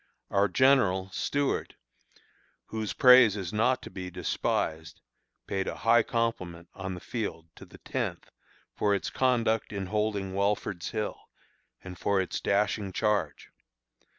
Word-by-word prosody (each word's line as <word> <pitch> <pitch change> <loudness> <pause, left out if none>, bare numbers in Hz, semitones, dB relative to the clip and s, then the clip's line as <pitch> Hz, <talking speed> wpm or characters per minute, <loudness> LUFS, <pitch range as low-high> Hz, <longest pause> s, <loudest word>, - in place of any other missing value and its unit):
Our 100 +1 +3
General 95 -5 +3
(Stuart), 140 +6 -1 0.9
whose 110 -1 -3
praise 125 -5 +7
is 95 -2 -5
not 120 +4 +2
to - - -9
be 90 -1 -6
despised, 80 -2 -2 0.5
paid 95 -1 -2
a - - -3
high 115 +1 +6
compliment 95 -8 -3
on 95 -1 -5
the - - -8
field 85 -7 -5
to - - -11
the - - -15
Tenth - - -4 0.4
for 100 -1 +1
its 100 - -3
conduct 115 -4 +1
in 100 -2 -3
holding 105 -1 -1
Welford's 100 -2 -1
Hill, 110 -2 -4 0.5
and 90 -1 -9
for 100 -1 +1
its 95 - -2
dashing 100 0 0
charge. 105 -9 -1
100 Hz, 135 wpm, -28 LUFS, 95-110 Hz, 0.9 s, praise